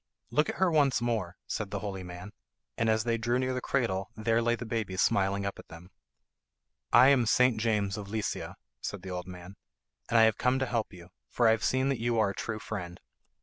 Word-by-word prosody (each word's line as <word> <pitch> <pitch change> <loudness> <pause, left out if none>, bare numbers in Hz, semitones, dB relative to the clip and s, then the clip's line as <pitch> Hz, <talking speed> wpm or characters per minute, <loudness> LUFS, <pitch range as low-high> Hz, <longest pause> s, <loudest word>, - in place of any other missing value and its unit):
"Look 150 +1 +2
at - - -3
her 190 -1 +2
once 145 -5 +3
more," 110 -6 -2
said 105 -2 -4
the 105 - -3
holy 100 -1 -5
man, 90 +3 -9 0.4
and 115 0 0
as 110 0 +2
they 115 0 0
drew 120 +2 +1
near 130 0 0
the 125 - -3
cradle 100 -10 -1
there 115 +1 +1
lay 120 0 +2
the 120 - -7
baby 110 -4 -3
smiling 100 +1 +1
up 100 - -4
at - - -12
them. 90 +3 -13 1.0
"I 125 +3 +8
am 130 -5 +4
St. 125 -2 +3
James 105 -3 0
of 105 -2 -6
Lizia," 110 0 -3 0.3
said - - -5
the 95 - -6
old 90 0 -5
man, 90 +1 -10 0.5
"and 115 - +3
I 115 - +7
have 110 -2 +3
come 125 +1 +2
to 135 - 0
help 115 -3 -2
you, 90 -2 -13 0.2
for 120 - +2
I - - +6
have 110 -1 0
seen 130 +1 +1
that 135 -4 -1
you 120 0 0
are 105 -3 +3
a - - -7
true 110 +2 -4
friend. 90 -5 -6
110 Hz, 230 wpm, -29 LUFS, 100-120 Hz, 1.0 s, I